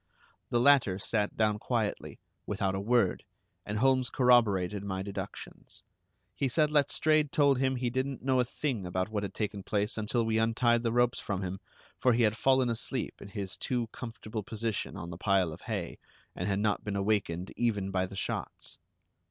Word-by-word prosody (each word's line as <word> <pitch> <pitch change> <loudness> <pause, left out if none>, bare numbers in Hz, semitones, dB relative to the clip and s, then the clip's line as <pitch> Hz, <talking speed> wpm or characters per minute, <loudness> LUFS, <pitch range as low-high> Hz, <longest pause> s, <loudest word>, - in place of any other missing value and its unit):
The 120 - +2
latter 125 -8 +5
sat 105 +1 -1
down 105 -1 +2
quietly, 115 -3 -2 0.3
without 95 -1 -1
a 95 - -2
word, 115 -2 +2 0.4
and 105 - -2
Holmes 130 +1 +3
corroborated 105 -6 +3
my 95 -1 -3
deductions. 100 0 -8 0.5
He 135 - 0
said 150 +3 +2
Letstrayed 150 0 +3
told 140 -3 +3
him 130 0 +1
he 125 -1 -1
didn't 130 +1 -2
know 130 -1 +2
a - - +5
thing 120 -5 -3
about 95 +2 -1
what 105 -2 -2
had 100 -2 -5
taken 105 -2 -2
place 105 +3 -1
until 115 +2 0
we 110 0 +1
untied 120 +1 +2
the 115 -1 0
ropes 120 0 +2
from 100 -2 -3
him; 95 +1 -4 0.4
for 125 - +4
he 120 +1 +3
had 105 -1 +3
fallen 130 +1 +3
asleep 115 -2 -3
in - - -8
his 100 -2 -5
too 120 -3 -1
comfortable 110 -2 -6
position 110 +1 -3
on 85 +2 -6
the 85 - -8
pile 95 -5 +2
of 85 - -11
hay, 100 -7 -4 0.4
and 90 - -3
had 100 -1 +1
not 105 0 0
been 105 -1 -3
awakened 100 -3 0
even 105 -5 0
by 95 -1 0
the 100 - -10
shots. - - -5
110 Hz, 185 wpm, -30 LUFS, 100-125 Hz, 0.5 s, latter